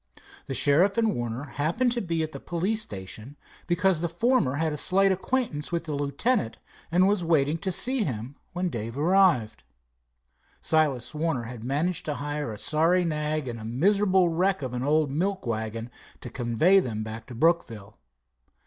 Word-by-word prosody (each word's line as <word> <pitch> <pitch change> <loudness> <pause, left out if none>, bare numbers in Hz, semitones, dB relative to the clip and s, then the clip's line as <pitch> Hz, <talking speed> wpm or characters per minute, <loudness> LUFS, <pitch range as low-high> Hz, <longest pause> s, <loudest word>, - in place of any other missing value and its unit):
The 135 - -3
sheriff 175 - +4
and 225 -2 +2
Warner 120 +2 -4
happened 160 - 0
to 240 0 -1
be 165 -3 -1
at 155 - -4
the - - -8
police 190 +6 -1
station, 105 - -8 0.3
because 175 -1 +2
the 170 - -1
former 175 - +1
had 160 +1 0
a - - -2
slight 195 +5 +3
acquaintance 190 - -2
with 170 -1 -1
the 155 -2 -5
lieutenant, 145 - 0 0.3
and 180 +2 +4
was 200 -3 +1
waiting 160 -1 +2
to 190 +2 -2
see 255 +6 +2
him 125 - -5 0.2
when 180 0 -2
Dave 115 +1 -5
arrived. 165 - +3 1.0
Silas 150 -6 0
Warner 155 -5 -1
had 115 -1 -8
managed 150 +7 -1
to 150 - -2
hire 145 -3 -4
a 105 - -7
sorry 165 - +2
nag 150 -2 -2
and 115 -1 -5
a - - -9
miserable 185 - +2
wreck 180 0 0
of 125 -2 -4
an 125 - -3
old 150 +1 +2
milk 190 +5 -1
wagon 115 +1 -4 0.3
to 120 - -8
convey 130 +12 +3
them 110 - -3
back 110 +1 -8
to 125 - -9
Brookville. 115 - 0
155 Hz, 175 wpm, -26 LUFS, 125-185 Hz, 1.0 s, sheriff